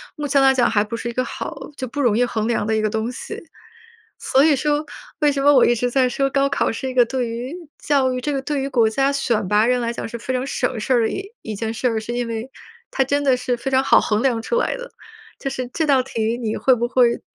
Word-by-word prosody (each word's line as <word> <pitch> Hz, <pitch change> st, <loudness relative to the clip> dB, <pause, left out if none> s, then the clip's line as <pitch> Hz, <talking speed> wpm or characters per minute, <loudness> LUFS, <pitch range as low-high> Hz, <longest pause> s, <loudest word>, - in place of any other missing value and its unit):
目 295 Hz, -1 st, -4 dB
前 275 Hz, 0 st, +3 dB
来 270 Hz, 0 st, +5 dB
讲， 250 Hz, -2 st, +3 dB
还 210 Hz, -2 st, +2 dB
不 225 Hz, +2 st, -5 dB
是 235 Hz, +1 st, -4 dB
一 -, -, -6 dB
个 255 Hz, +2 st, -1 dB
好 320 Hz, -, -6 dB, 0.2 s
就 260 Hz, -3 st, -5 dB
不 290 Hz, -, -6 dB
容 230 Hz, -5 st, +2 dB
易 245 Hz, -, +3 dB
衡 220 Hz, -2 st, -2 dB
量 230 Hz, -3 st, 0 dB
的 220 Hz, -, +1 dB
一 220 Hz, -, +1 dB
个 215 Hz, -, +1 dB
东 220 Hz, +3 st, -2 dB
西。 -, -, -7 dB, 0.8 s
所 270 Hz, +2 st, +3 dB
以 300 Hz, -3 st, +4 dB
说， 295 Hz, +2 st, 0 dB, 0.4 s
为 295 Hz, -1 st, +4 dB
什 275 Hz, -1 st, -2 dB
么 290 Hz, -, +6 dB
我 255 Hz, -, +6 dB
一 240 Hz, -, +4 dB
直 245 Hz, +2 st, -1 dB
在 255 Hz, 0 st, +2 dB
说， 275 Hz, +2 st, 0 dB
高 275 Hz, 0 st, +2 dB
考 -, -, 0 dB
是 260 Hz, +3 st, -4 dB
一 255 Hz, -, -5 dB
个 245 Hz, -2 st, +5 dB
对 250 Hz, 0 st, -2 dB
于 240 Hz, +6 st, -5 dB, 0.2 s
教 270 Hz, -3 st, +1 dB
育 250 Hz, -, -3 dB
这 295 Hz, +3 st, -2 dB
个 275 Hz, -, -1 dB
对 290 Hz, -1 st, -2 dB
于 275 Hz, -, -2 dB
国 235 Hz, -5 st, +3 dB
家 270 Hz, +5 st, +1 dB
选 235 Hz, -7 st, 0 dB
拔 210 Hz, +2 st, +3 dB
人 250 Hz, 0 st, +2 dB
来 235 Hz, 0 st, -1 dB
讲， 235 Hz, -, -5 dB
是 235 Hz, +1 st, -6 dB
非 260 Hz, +3 st, -4 dB
常 255 Hz, +1 st, -1 dB
省 250 Hz, -4 st, -2 dB
事 255 Hz, -, -1 dB
儿 245 Hz, -, +4 dB
的 225 Hz, -, +1 dB
一 395 Hz, +1 st, -5 dB
一 220 Hz, -, -5 dB
件 225 Hz, +2 st, -3 dB
事 240 Hz, +3 st, -3 dB
儿， 225 Hz, -2 st, +1 dB
是 225 Hz, +2 st, -6 dB
因 245 Hz, 0 st, -1 dB
为， 230 Hz, +2 st, -5 dB, 0.4 s
它 270 Hz, -, +1 dB
真 285 Hz, +2 st, 0 dB
的 265 Hz, -3 st, +3 dB
是 250 Hz, 0 st, -2 dB
非 270 Hz, +3 st, -4 dB
常 265 Hz, 0 st, +2 dB
好 -, -, +5 dB
衡 215 Hz, +2 st, 0 dB
量 240 Hz, -4 st, +1 dB
出 475 Hz, -, -1 dB
来 -, -, 0 dB
的。 -, -, -9 dB, 0.5 s
就 275 Hz, -, -3 dB
是 255 Hz, -2 st, -4 dB
这 320 Hz, -2 st, 0 dB
道 270 Hz, -3 st, +4 dB
题 230 Hz, -3 st, -2 dB
你 225 Hz, -3 st, -3 dB
会 260 Hz, -, +4 dB
不 240 Hz, 0 st, -1 dB
会， 240 Hz, -1 st, +3 dB
250 Hz, 305 characters per minute, -21 LUFS, 230-275 Hz, 0.8 s, 么